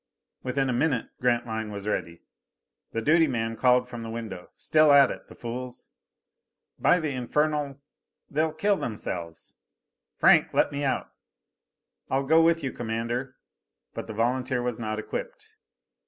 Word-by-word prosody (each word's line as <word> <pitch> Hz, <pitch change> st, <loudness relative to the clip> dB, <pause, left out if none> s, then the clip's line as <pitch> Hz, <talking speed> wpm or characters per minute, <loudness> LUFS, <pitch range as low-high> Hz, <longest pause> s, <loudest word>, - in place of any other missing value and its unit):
Within 135 Hz, +1 st, 0 dB
a 125 Hz, -, 0 dB
minute 125 Hz, -1 st, 0 dB
Grantline 115 Hz, -3 st, 0 dB
was 100 Hz, 0 st, -6 dB
ready. 85 Hz, -5 st, -3 dB, 0.7 s
The 115 Hz, -, -3 dB
duty 160 Hz, +3 st, +5 dB
man 115 Hz, -3 st, -2 dB
called 125 Hz, +1 st, +3 dB
from 120 Hz, -2 st, -7 dB
the 115 Hz, -, -6 dB
window, 110 Hz, -6 st, -6 dB
"Still 155 Hz, -1 st, +4 dB
at 140 Hz, -2 st, +7 dB
it, -, -, -9 dB
the -, -, -13 dB
fools. 125 Hz, +1 st, -7 dB, 0.9 s
By 180 Hz, -, +4 dB
the 155 Hz, -3 st, -2 dB
infernal 145 Hz, +2 st, -1 dB, 0.5 s
they'll 155 Hz, +2 st, 0 dB
kill 200 Hz, +6 st, +1 dB
themselves!" 85 Hz, -7 st, -6 dB, 0.6 s
"Franck, -, -, +4 dB
let -, -, +3 dB
me 145 Hz, 0 st, -3 dB
out." 135 Hz, -, -1 dB, 1.0 s
"I'll 135 Hz, +1 st, 0 dB
go 160 Hz, +3 st, +5 dB
with 165 Hz, -1 st, +3 dB
you, 135 Hz, -, -1 dB
Commander." 120 Hz, +3 st, -3 dB, 0.6 s
But -, -, -6 dB
the 110 Hz, -, -6 dB
volunteer 125 Hz, +3 st, 0 dB
was 120 Hz, -2 st, -2 dB
not 110 Hz, -1 st, -3 dB
equipped. 440 Hz, -, -6 dB
125 Hz, 145 wpm, -27 LUFS, 115-145 Hz, 1.0 s, at